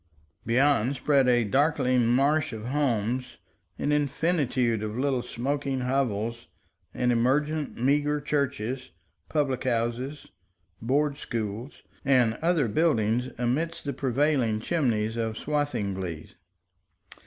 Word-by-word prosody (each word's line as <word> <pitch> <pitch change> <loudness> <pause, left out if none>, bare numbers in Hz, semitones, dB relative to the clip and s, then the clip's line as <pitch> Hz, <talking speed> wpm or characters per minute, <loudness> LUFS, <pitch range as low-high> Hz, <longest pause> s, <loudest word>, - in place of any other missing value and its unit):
Beyond, 135 +1 +3
spread 140 -2 +3
a 120 -1 +4
darkling 130 0 +2
marsh 140 +3 +2
of 110 +2 -6
homes, 125 -3 -1 0.4
an 145 - -1
infinitude 140 - +1
of 110 +1 -4
little 130 -1 +1
smoking 135 +2 -2
hovels, 115 -3 -1 0.4
and 125 0 0
emergent, 145 +5 +1
meager 145 +4 +2
churches, 135 -4 -2 0.4
public 140 -5 0
houses, 125 +4 -2 0.5
board 140 +4 +1
schools, 115 +2 -5 0.2
and 125 -5 +3
other 165 -5 +2
buildings 125 -3 +1
amidst 130 +8 -1
the 140 - -3
prevailing 130 -3 +1
chimneys 115 -6 0
of 115 -1 -2
Swathinglea. 100 - -2
130 Hz, 105 wpm, -27 LUFS, 115-145 Hz, 0.5 s, a